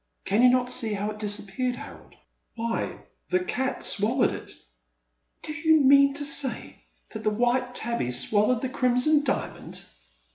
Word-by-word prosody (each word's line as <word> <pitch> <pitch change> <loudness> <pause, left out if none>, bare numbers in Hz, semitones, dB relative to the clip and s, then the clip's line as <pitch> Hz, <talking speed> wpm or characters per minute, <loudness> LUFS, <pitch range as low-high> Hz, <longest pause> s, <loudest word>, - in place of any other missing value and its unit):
Can 205 +4 +1
you 250 - +7
not 250 0 +1
see 225 -3 -1
how 205 +1 -3
it 210 - -10
disappeared, 210 +4 -2
Harold? - - -12 0.4
Why, 230 0 -3 0.3
the 360 - +2
cat 265 -7 -3
swallowed 230 +6 +1
it! - - -8 0.5
" - - -50
Do 305 - -5
you 320 0 +3
mean 275 0 +5
to 290 0 -1
say 265 - 0 0.3
that - - -8
the 215 - +2
white 245 +3 0
tabby 235 - -2
swal 205 - +2
lowed 250 -2 +1
the 260 - -1
Crimson 255 +4 +2
Diamond 270 - -4
245 Hz, 160 wpm, -25 LUFS, 210-270 Hz, 0.5 s, you